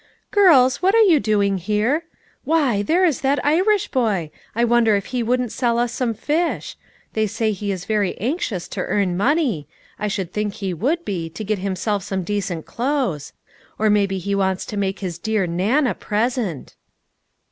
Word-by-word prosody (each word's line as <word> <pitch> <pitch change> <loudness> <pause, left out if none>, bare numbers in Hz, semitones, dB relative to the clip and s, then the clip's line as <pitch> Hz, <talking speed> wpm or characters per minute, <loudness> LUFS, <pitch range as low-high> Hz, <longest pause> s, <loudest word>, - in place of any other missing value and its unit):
" - - -43
Girls, 310 -12 +5
what 385 +3 +3
are 455 - +7
you 345 -8 +5
doing 200 -4 +1
here? 215 - 0 0.4
Why, 285 -10 +2
there 340 - +2
is 315 -7 +1
that 275 +1 +2
Irish 370 +7 +3
boy; 205 - 0 0.2
I 235 - +2
wonder 235 -2 +4
if 200 - -1
he 250 - 0
wouldn't 245 0 0
sell 240 -3 0
us 240 0 +1
some 240 -3 -1
fish? 310 +9 -1 0.4
They 220 -1 +1
say 220 +1 -1
he 205 0 -3
is 185 -2 -5
very 210 -4 0
anxious 230 - -2
to - - -4
earn 195 -4 0
money; 230 - +1 0.3
I 210 - -1
should 190 -4 -3
think 210 -1 -2
he 195 -3 -3
would 290 - -1
be, 170 -5 -3
to 170 +6 -7
get 210 -1 -1
himself 200 +2 -1
some 190 -1 -3
decent 185 -4 -3
clothes. 240 - -2 0.4
Or 215 0 +2
maybe 200 -2 +2
he 200 +2 -3
wants 190 -1 0
to 210 - -6
make 195 -1 -2
his 175 -3 -4
dear 215 -1 0
Nan 200 - +1
a 250 - +1
present." 215 - -2
215 Hz, 185 wpm, -21 LUFS, 195-255 Hz, 0.4 s, are